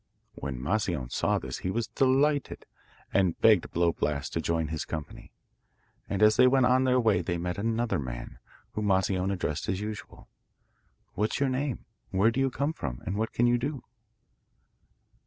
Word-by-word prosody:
When 65 -3 -5
Moscione 85 - -1
saw - - +1
this - - -5
he 90 - -3
was 115 +4 -1
delighted, 140 +2 +1 0.5
and 95 -4 +2
begged 105 -6 +5
Blow 85 0 +2
Blast 75 -2 -2
to 80 - -1
join 80 -1 -1
his 80 -1 -3
company. 80 -2 -7 0.8
And 100 +1 +1
as 105 0 +6
they 125 - +7
went 130 0 +4
on 130 +1 +4
their 130 0 +3
way 110 -4 +3
they 90 -2 -2
met 90 +2 -3
another 115 -3 0
man, - - -6 0.3
whom 105 -1 -2
Moscione 95 0 +1
addressed 80 -5 -2
as 95 - 0
usual: 105 0 -7 0.9
'What's 105 +2 -1
your 140 -1 +2
name: 130 0 -2 0.2
where 100 +4 +3
do 120 - -2
you 135 0 +2
come 140 +4 -1
from, 60 - -6
and 95 - -2
what 110 +2 -1
can 120 - +2
you 120 0 +3
do? 140 +1 -3
100 Hz, 175 wpm, -28 LUFS, 85-125 Hz, 0.9 s, they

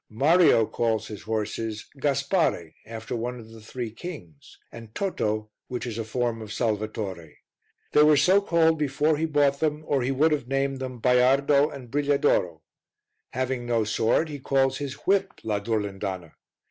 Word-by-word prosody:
Mario 145 +1 +4
calls 110 -1 -1
his 105 -3 -8
horses 110 0 -3
Gaspare, 140 - 0
after 110 +1 -6
one 120 +2 -4
of 110 -1 -12
the 115 0 -13
Three 115 +1 -6
Kings, 105 - -10
and 115 -2 -12
Toto, 110 - -2 0.2
which 125 0 -4
is 115 -2 -5
a - - -1
form 115 0 -2
of 110 -1 -8
Salvatore. 105 -8 -3 0.6
They 150 - +5
were 150 -1 +6
so 185 +9 +4
called 165 -4 +2
before 150 +2 +1
he 160 - 0
bought 145 -3 +2
them, 155 -1 -1
or 140 -3 +1
he 125 - -1
would 145 +4 +2
have 145 -5 -1
named 135 0 -1
them 130 -2 -6
Baiardo 135 +4 +4
and 130 -6 -10
Brigliadoro. 140 - +1 0.7
Having 130 -1 -2
no 115 -2 +1
sword, 115 +8 +1
he 145 -1 -6
calls 135 0 +1
his 140 -2 -4
whip 195 0 +2
la 105 -2 -1
Durlindana. 100 -5 -3
125 Hz, 160 wpm, -25 LUFS, 110-145 Hz, 0.7 s, were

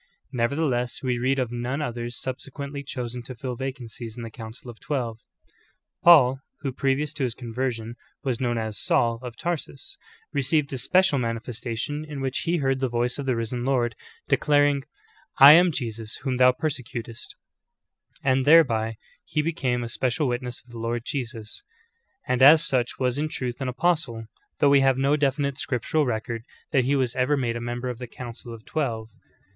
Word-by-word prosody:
Nevertheless, 125 0 0
w^e 125 -2 -1
read 135 +2 +2
of 125 -3 -1
none 120 +3 -2
others 120 -4 -4
subsequently 140 +2 -5
chosen 125 -3 -5
to 125 +2 -9
fill 125 +1 -4
vacancies 120 -3 -6
in 120 - -5
the 115 - -7
council 115 +2 -9
of 115 - -17
twelve. 120 -6 -3 0.8
Paul, 135 -7 +7 0.2
who 140 -2 -2
previous 135 +3 0
to 145 - -3
his 120 -3 -1
conversion 120 -1 -3 0.3
was 130 -4 -1
known 120 -2 0
as 110 -2 -3
Saul 115 -1 +2
of 125 -2 -8
Tarsus, 170 -5 -4 0.4
received 140 +1 +1
a 130 - -3
special 185 +1 +3
manifestation, 115 +4 -3
in 150 -2 -7
which 135 0 -1
he 170 +1 +2
heard 135 -3 +1
the 130 -1 0
voice 120 +3 0
of 140 - -4
the 130 - +2
Risen 115 +1 -2
Lord 125 -3 +1 0.3
declaring 145 -1 +3 0.5
''I 140 +2 +12
am 175 +2 +6
Jesus 115 -5 -4
whom 130 -2 -1
thou 125 0 +7
persecutest,"^ 125 -4 -5 0.9
and 130 0 +3
thereby 115 -8 +5 0.3
he 150 - -1
be 165 +2 0
came 125 -5 -1
a - - -3
special 130 +5 0
witness 125 0 -3
of 120 - -20
the 115 - -8
Lord 115 +1 -2
Jesus, 120 -6 -5 0.7
and 125 0 +1
as 150 +3 +8
such 125 -4 0
was 130 +1 0
in 155 +1 -1
truth 125 -5 -4
an 135 - -1
apostle, 125 -4 0 0.3
though 145 - +4
we 140 -1 +6
have 135 -1 +3
no 135 +2 +3
definite 140 -1 0
scriptural 145 +1 0
record 115 0 -2 0.3
that 135 -5 +3
he 140 +2 +2
was 130 -3 0
ever 130 +3 +2
made 120 -3 -1
a 120 - -4
member 120 +1 -3
of 120 - -9
the 125 - -6
council 120 0 -9
of 115 -2 -10
twelve. 115 -7 -2
125 Hz, 180 wpm, -25 LUFS, 120-140 Hz, 0.9 s, I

